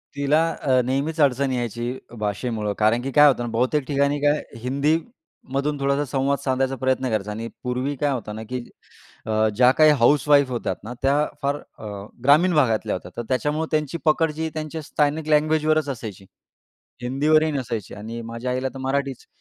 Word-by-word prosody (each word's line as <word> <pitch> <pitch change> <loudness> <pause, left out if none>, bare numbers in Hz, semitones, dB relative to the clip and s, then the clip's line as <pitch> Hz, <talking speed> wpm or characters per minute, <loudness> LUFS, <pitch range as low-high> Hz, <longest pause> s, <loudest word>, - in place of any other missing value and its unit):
तिला 140 +2 +2 0.2
अ, 130 -2 +3
नेहमीच 140 +5 -1
अडचण 135 -1 +2
यायची 120 0 -3 0.2
भाषेमुळं. 105 0 -2
कारण 110 +3 +3
की 135 +2 -4
काय 150 +3 +7
होतं 130 -4 +2
ना 120 - -3
बहुतेक 125 +6 +1
ठिकाणी 140 0 +1
काय 145 +1 +2 0.2
हिंदी 140 +5 +1 0.6
मधून 145 +2 0
थोडासा 140 +1 +1
संवाद 140 +1 0
साधायचा 135 -1 0
प्रयत्न 130 +1 0
करायचा 105 -2 -1
आणि 115 +2 -5 0.2
पूर्वी 125 +3 -2
काय 145 - +2
होतं 110 -5 -4
ना 110 - -6
की 125 -1 -3 0.6
अ, 110 0 +2
ज्याकाही 130 +6 +6
हाउसवाईफ 140 +2 +4
होत्या 120 - -2
ना, 115 +3 -6
त्या 135 +1 +3 0.3
फार 140 0 0 0.2
अ, - - -10 0.4
ग्रामीण 155 +7 +5
भागातल्या 115 -7 +2
होत्या. 90 - -8
तर - - -1
त्याच्यामुळं 150 +5 0
त्यांची 155 0 0
पकड 160 +1 +3
जी 160 0 -1
त्यांच्या 155 0 -5
स्थानिक 150 +1 -1
लँग्वेजवरच 155 0 +2
असायची. 110 -7 -6 0.8
हिंदीवरही 155 +5 +2
नसायची 120 -7 -4
आणि 115 +3 -7
माझ्या 115 +2 -4
आईला 130 +1 -1
तर - - -7
मराठीच. 135 0 -2
135 Hz, 165 wpm, -23 LUFS, 120-150 Hz, 0.8 s, काय